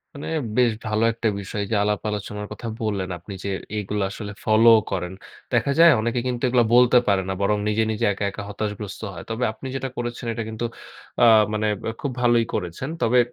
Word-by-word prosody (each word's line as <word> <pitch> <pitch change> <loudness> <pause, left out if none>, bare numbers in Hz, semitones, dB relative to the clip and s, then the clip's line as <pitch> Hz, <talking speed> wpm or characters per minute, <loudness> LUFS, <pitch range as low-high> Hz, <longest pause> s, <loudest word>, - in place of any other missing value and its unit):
মানে 140 - -7 0.3
বেশ 125 -2 +5
ভালো 110 0 0
একটা 115 0 -1
বিষয় 100 +1 -4
এইযে 110 - -2
আলাপ 105 0 0
আলোচনার 105 0 -4
কথা 105 +3 -6
বললেন 100 -4 -2
আপনি 95 +4 -10
যে, 100 - -2 0.3
এইগুলা 105 0 -2
আসলে 100 0 -6
ফলোও 110 +1 +6
করেন। 90 -1 -2 0.4
দেখা 140 - +2
যায় 170 0 +9
অনেকে 120 +2 0
কিন্তু 125 -1 -3
এগুলা 120 -1 +3
বলতে 125 0 +6
পারে 100 -1 +3
না। - - 0
বরং 105 +1 +2
নিজে, 105 +1 +2
নিজে 110 - -1
একা, 100 - -5
একা 100 +1 -7
হতাশাগ্রস্ত 105 -1 -5
হয়। 80 - -8
তবে 115 +2 -2
আপনি 110 +4 -9
যেটা 135 0 -3
করেছেন 120 +1 -4
এটা 115 - -3
কিন্তু 110 +1 -4 0.6
আ - - +9 0.3
মানে 110 0 0 0.2
ব্যা - - -2
খুব 140 - -2
ভালোই 120 -1 +4
করেছেন। 90 - -3
তবে 125 +2 +4
110 Hz, 200 wpm, -23 LUFS, 105-120 Hz, 0.6 s, যায়